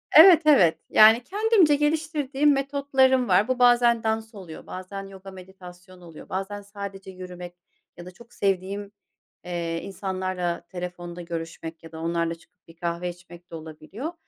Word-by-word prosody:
Evet, 335 +1 +9
evet. 190 - +5
Yani 220 +3 +6
kendimce 405 - +3
geliştirdiğim 295 -1 +1
metotlarım 270 -2 +2
var, 190 +4 +3
bu 255 -1 -1
bazen 240 -2 +4
dans 220 0 -2
oluyor, 175 -5 -11
bazen 195 +2 -7
yoga 195 0 -12
meditasyonu 185 -1 -14
oluyor, 165 -2 -13
bazen 195 +2 -4
sadece 200 -1 -9
yürümek, 180 -1 -9 0.4
ya 175 - -10
da 180 - -10
çok 235 +6 -18
sevdiğim, 200 +1 -2 0.5
eee, 170 -1 -3
insanlarla 185 -2 -3
telefonda 175 -1 -7
görüşmek, 165 -1 -7
ya 165 - -12
da 160 - -9
onlarla 170 0 -1
çıkıp 165 0 -27
bir 165 - -16
kahve 170 +1 -3
içmek 175 0 -13
de - - -7
olabiliyor. 160 - -8
190 Hz, 145 wpm, -25 LUFS, 175-245 Hz, 0.5 s, Evet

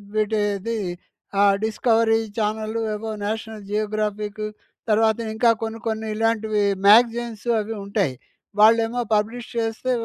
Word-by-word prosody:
వీటిది. 215 +1 0 0.6
ఆ! - - +6 0.2
Discovery 225 0 +2 0.2
channel 215 +1 -1 0.2
ఏవో 220 +1 -5
national 220 0 -5
Geographic 210 0 -2 0.5
తర్వాత 220 +1 +3 0.2
ఇంకా 230 +2 +3
కొన్ని 225 0 -4
కొన్ని 220 0 -2
ఇలాంటివి 220 -1 +1 0.2
మ్యాగజైన్సు 235 +1 +4
అవి 220 +2 -5
ఉంటాయి. 200 -8 0 0.5
వాళ్ళు 220 +2 +7
ఏమో 240 +2 -2
పబ్లిష్ 225 +3 -2
చేస్తే, 225 +2 -1
220 Hz, 115 wpm, -23 LUFS, 210-225 Hz, 0.6 s, వాళ్ళు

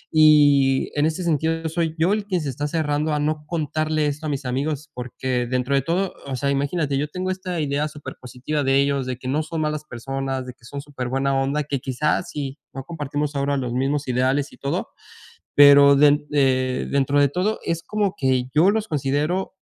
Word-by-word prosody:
Y 145 -3 +5
en 145 +2 +2
ese 160 +3 -3
sentido, 165 0 0
soy 165 -1 -1
yo 170 +5 +2
el 210 -1 -1
quien 190 -3 -1
se 150 -4 -3
está 145 +3 -3
cerrando 150 -1 -1
a 150 - 0
no 150 0 -1
contarle 155 -1 -1
esto 150 +2 -3
a - - -2
mis 140 -2 -3
amigos, 145 +4 -3
porque 125 0 -3
dentro 125 +2 -1
de 135 - +3
todo, 180 +6 -1
o 135 - -3
sea, 140 +3 0
imagínate, 140 0 0
yo 150 - -1
tengo 185 +4 -3
esta 185 -2 -4
idea 145 0 0
supérpositiva 145 -1 -5
de 135 0 +2
ellos 140 -2 0
de 125 - -3
que 130 - -8
no 145 +4 +1
son 160 0 -4
malas 150 0 -2
personas 135 +2 -4
de 125 - -8
que 120 -1 -22
son 140 +3 -6
supérbuena 135 -1 -2
onda 140 +3 0
que 140 -1 -3
quizás 135 +4 -1
si 140 0 -5 0.2
no 135 - -5
compartimos 145 -2 -4
ahora 140 0 0
los 125 -2 -3
mismos 135 +2 -1
ideales 130 +3 0
y - - -15
todo. 140 - -3 0.7
Pero 140 0 +8
den 145 +1 +4
eh, 130 -2 +1
dentro 140 +1 +2
de 140 - +5
todo 185 +9 -1
es 165 0 -2
como 205 -3 -1
que 130 -2 +1
yo 170 +7 +4
los 220 0 -2
considero, 150 +7 -1
145 Hz, 200 wpm, -22 LUFS, 135-155 Hz, 0.7 s, Pero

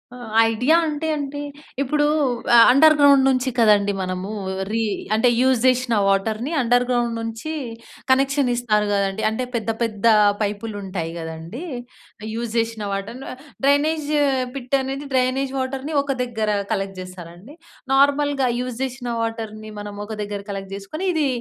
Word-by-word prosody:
ఆహ్, 240 -3 -9 0.2
ఐడియా 250 +8 +2
అంటే 305 +1 -3
అంటే, 285 0 -4 0.4
ఇప్పుడూ 295 +2 +1 0.5
ఆహ్, 230 - +9
అండర్‌గ్రౌం‌డ్ 285 -1 +6
నుంచి 260 -1 +2
కదండీ 205 -2 +4
మనమూ 185 +2 -4 0.4
రీ 225 0 0 0.3
అంటే, 235 +3 +4
యూజ్ 260 -3 +3
జేషిన 250 -2 +2
వాటర్‍ని 215 +7 0
అండర్‌గ్రౌండ్ 245 0 +1
నుంచీ 225 +7 -5 0.6
కనెక్షన్ 270 0 +3
ఇస్తారు 210 -4 +1
గదండి. 200 +1 0
అంటే, 220 +4 -2
పెద్ద 225 -1 -2
పెద్దా 225 0 +2 0.3
పైపులుంటాయి 200 -5 -3
గదండీ. 165 - -7 0.7
యూజ్ 230 0 -4
జేషిన 225 -2 -1
వాటర్‌‌ను 205 +7 -5 0.4
డ్రైనేజ్ 290 +2 +2 0.5
పిట్ 255 +1 -1
అనేది 270 +2 -5
డ్రైనేజ్ 260 +1 +1
వాటర్‍ని 270 +3 -3
ఒక 280 0 -3
దగ్గరా 220 -4 -1 0.2
కలెక్ట్ 195 -1 -3
జేస్తారాండి? 185 - -10 0.4
నార్మల్‌గా 280 -1 +3
యూజ్ 250 -2 -4
జేషిన 250 -1 -4
వాటర్‍ని 220 -1 -5
మనం 205 0 -7
ఒక 220 - -7
దగ్గర 205 -1 -4
కలెక్ట్ 195 -1 -6
చేసుకొని, 310 - -5
ఇదీ 310 -3 +1
235 Hz, 130 wpm, -22 LUFS, 210-270 Hz, 0.7 s, ఆహ్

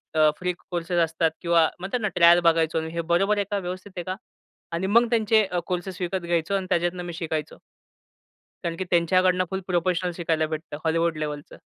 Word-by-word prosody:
अ, 155 -1 +5
free 180 0 -1 0.2
courses 175 0 -2
असतात 160 0 0
किंवा 170 -2 +3
म्हणतात 195 +7 -2
ना, 210 - +1
ट्रायल 170 0 +7
बघायचो 160 -1 +1
आणि 160 0 -5
हे 170 - -1
बरोबर 195 +4 +3
आहे 205 - 0
का 205 - +1
व्यवस्थित 185 +2 -6
आहे 175 - -3
का? 185 +1 -4 0.6
आणि 175 +3 -2
मग 230 +3 +4
त्यांचे 220 -2 +3
अ, 180 -2 -2
कोर्सेस 180 +1 -4
विकत 180 +1 -1
घ्यायचो 170 +3 0
आणि 190 -1 -1
त्याच्यातनं 175 +1 0
मी 175 - -6
शिकायचो. 160 -3 -4 1.1
कारण 170 -1 -2
की 185 - -2
त्यांच्याकडनं 185 +1 +3
फुल 190 - -1
प्रोफेशनल 180 0 0
शिकायला 160 -2 0
भेटतं 155 -1 -6
हॉलिवूड 165 0 +1
लेव्हलचं. 150 -1 -5
175 Hz, 190 wpm, -25 LUFS, 165-185 Hz, 1.1 s, ट्रायल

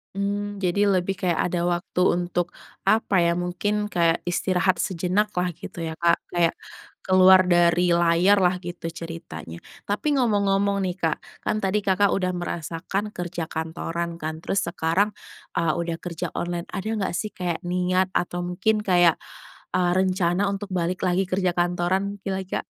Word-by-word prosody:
Hmm, 205 +1 -2
jadi 200 +2 +2
lebih 190 0 +1
kayak 175 -3 +1
ada 175 -1 0
waktu 175 +1 -1
untuk, 175 -1 +1 0.3
apa 195 -3 +2
ya, 170 0 +2
mungkin 205 +4 -1
kayak 170 -1 +2
istirahat 180 0 +1
sejenak 190 +3 0
lah 180 -1 0
gitu 165 +1 -7
ya 160 - -4
Kak, 170 0 +4 0.2
kayak 170 -1 +2 0.5
keluar 185 0 +7
dari 175 0 +4
layar 175 +4 +4
lah 180 0 +3
gitu 175 -2 -6
ceritanya. 165 - -8 0.2
Tapi 205 +9 -2
ngomong-ngomong 200 -4 +2
nih 185 -1 -2
Kak, 165 -4 0 0.3
kan 215 - 0
tadi 195 +1 0
Kakak 195 +1 +3
udah 185 -1 0
merasakan 175 +4 -4
kerja 175 -2 -4
kantoran 165 +1 -4
kan 160 0 -5
terus 195 - 0
sekarang, 180 +4 0 0.4
eee, 160 -2 +1
udah 170 -1 -2
kerja 175 0 -5
online, 175 0 -3
ada 195 +3 -3
nggak 210 -5 -1
sih 210 +4 -2
kayak 175 -3 -3
niat 180 +1 +1
atau 175 -1 -2
mungkin 185 +5 0
kayak, 175 -4 +4 0.6
eee, 175 -1 +2
rencana 185 +1 +1
untuk 200 0 -4
balik 180 +1 -1
lagi 185 +1 +1
kerja 185 -1 +1
kantoran 180 +3 0
lagi, 190 -1 -3
Kak? - - -5
180 Hz, 155 wpm, -24 LUFS, 170-195 Hz, 0.6 s, keluar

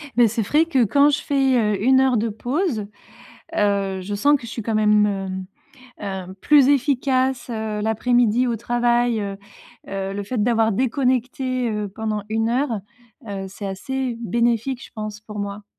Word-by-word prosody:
Mais 240 -1 +6
c'est 225 +1 -1
frais 300 +10 +3
que, 275 -7 +2
quand 280 +7 +4
je 290 - 0
fais, 270 -2 +2 0.2
heu, 195 - -5
1 260 +2 +5
heure 265 -2 +3
de 225 +2 0
pause, 245 - -2 0.7
heu, 200 -2 +1
je 205 +2 -4
sens 285 +8 +4
que - - -15
je 230 - -8
suis 230 - -4
quand 225 +1 -2
même, 210 -1 +4 1.0
ne 190 -3 -4
heu, - - -8
plus 285 -3 +5
efficace, 265 -2 +1
heu, 220 -2 -3
l'après-midi 240 +2 +2
au 235 - 0
travail. 240 0 +1
Heu 200 -1 -4 0.5
heu, 195 0 -3
le 205 0 -4
fait 220 +2 -2
d'avoir 225 -1 +2
déconnecté, 255 +1 0
heu, 210 -1 -2
pendant 215 0 -3
1 225 +1 0
heure, 245 -2 0 0.5
heu, 195 -1 -4
c'est 200 +1 -7
assez 250 +5 -3
bénéfique, 235 +3 0
je - - -17
pense, 215 -1 -6
pour 210 -1 -8
moi. 200 +1 -5
230 Hz, 175 wpm, -22 LUFS, 210-255 Hz, 1.0 s, Mais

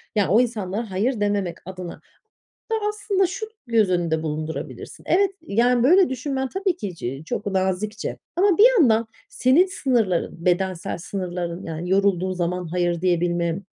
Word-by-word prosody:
Yani, 205 -4 +2
o 220 +5 +5
insanlara 220 -2 -3
hayır 220 +6 0
dememek 205 -4 0
adına 180 -1 -7 0.8
da - - +3
aslında 405 -2 0
şu 435 +6 -5 0.2
göz 225 -4 +3
önünde 170 -3 0
bulundurabilirsin. 155 +1 -5
Evet, 395 +2 +3
yani, 240 -3 +2
böyle 360 +7 +5
düşünmen 265 +1 -2
tabii 385 -2 -1
ki 195 - -5
ç 135 +1 -5
çok - - -3
nazikçe 195 +2 -2 0.2
ama 380 0 +3
bir 445 +4 +9
yandan 230 -5 +4 0.2
senin 325 -2 +4
sınırların, 225 - -1
bedensel 185 +1 0
sınırların 175 -1 -4
yani 165 +2 -5
yorulduğun 190 -1 +2
zaman 180 0 -2
hayır 175 0 -1
diyebilme, 175 -1 +1
195 Hz, 145 wpm, -23 LUFS, 175-255 Hz, 0.8 s, bir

